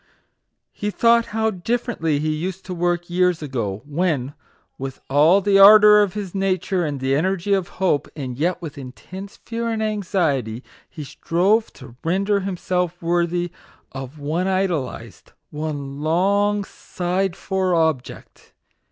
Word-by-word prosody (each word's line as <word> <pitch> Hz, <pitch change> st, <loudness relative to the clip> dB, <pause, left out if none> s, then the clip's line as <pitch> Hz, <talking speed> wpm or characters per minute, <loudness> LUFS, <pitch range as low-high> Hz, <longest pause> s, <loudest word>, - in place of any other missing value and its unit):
He 205 Hz, -, -4 dB
thought 235 Hz, +2 st, +3 dB
how 220 Hz, +1 st, 0 dB
differently 190 Hz, -, -1 dB
he 155 Hz, +1 st, -1 dB
used 180 Hz, +4 st, -5 dB
to 185 Hz, -, -5 dB
work 175 Hz, 0 st, -1 dB
years 180 Hz, -2 st, +1 dB
ago, 110 Hz, -8 st, -3 dB
when, 145 Hz, -3 st, -1 dB, 0.5 s
with 135 Hz, 0 st, -6 dB
all 155 Hz, +8 st, +5 dB
the 195 Hz, 0 st, +3 dB
ardour 210 Hz, +1 st, +9 dB
of 205 Hz, -1 st, 0 dB
his 200 Hz, -4 st, -5 dB
nature 190 Hz, -1 st, 0 dB
and 145 Hz, -3 st, -3 dB
the 130 Hz, +1 st, 0 dB
energy 185 Hz, +6 st, 0 dB
of 190 Hz, -3 st, +1 dB
hope, 185 Hz, -6 st, +1 dB
and 130 Hz, -5 st, -5 dB
yet 170 Hz, +7 st, 0 dB
with 155 Hz, -2 st, -7 dB
intense 185 Hz, +10 st, -10 dB
fear 230 Hz, 0 st, -4 dB
and 220 Hz, -1 st, -1 dB
anxiety, 165 Hz, -, -1 dB, 0.3 s
he 155 Hz, -, -8 dB
strove 190 Hz, +10 st, +1 dB
to 130 Hz, -3 st, -13 dB
render 195 Hz, +4 st, +1 dB
himself 180 Hz, -2 st, -2 dB
worthy 175 Hz, 0 st, 0 dB, 0.4 s
of 135 Hz, +2 st, -8 dB
one 155 Hz, +6 st, -2 dB
idolized, 185 Hz, -8 st, -3 dB, 0.2 s
one 145 Hz, -2 st, -5 dB
long 200 Hz, +6 st, +2 dB
sighed 185 Hz, -1 st, -3 dB
for 190 Hz, -2 st, -1 dB
object 160 Hz, -6 st, -2 dB
175 Hz, 140 wpm, -21 LUFS, 150-195 Hz, 0.5 s, ardour